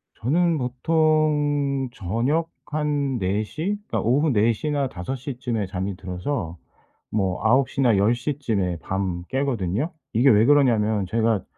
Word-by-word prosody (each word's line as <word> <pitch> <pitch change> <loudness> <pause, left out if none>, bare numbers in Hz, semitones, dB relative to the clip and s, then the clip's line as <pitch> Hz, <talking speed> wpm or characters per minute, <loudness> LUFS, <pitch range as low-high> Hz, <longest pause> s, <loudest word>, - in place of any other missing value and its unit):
저는 165 +7 +1
보통 145 0 +1
저녁 125 - -1 0.2
한 145 -3 0
4:00? 110 - -2
그러니까 - - -1
오후 140 +6 +2
4:00 115 +6 +1
나 140 -2 0
5:00 125 - -6
쯤에 115 -5 -2
잠이 95 0 -4
들어서 90 - -4 0.5
뭐 95 -3 -1
9:00 135 +4 +2
나 115 -6 +4
10:00 120 +8 +1
쯤에 95 - -1
밤 95 -2 -3
깨거든요. 130 - -1 0.2
이게 125 +5 +4
왜 110 0 +5
그러냐 140 -4 +5
하면 105 -2 0
제가 115 -2 +1
125 Hz, 205 characters per minute, -23 LUFS, 105-145 Hz, 0.5 s, 왜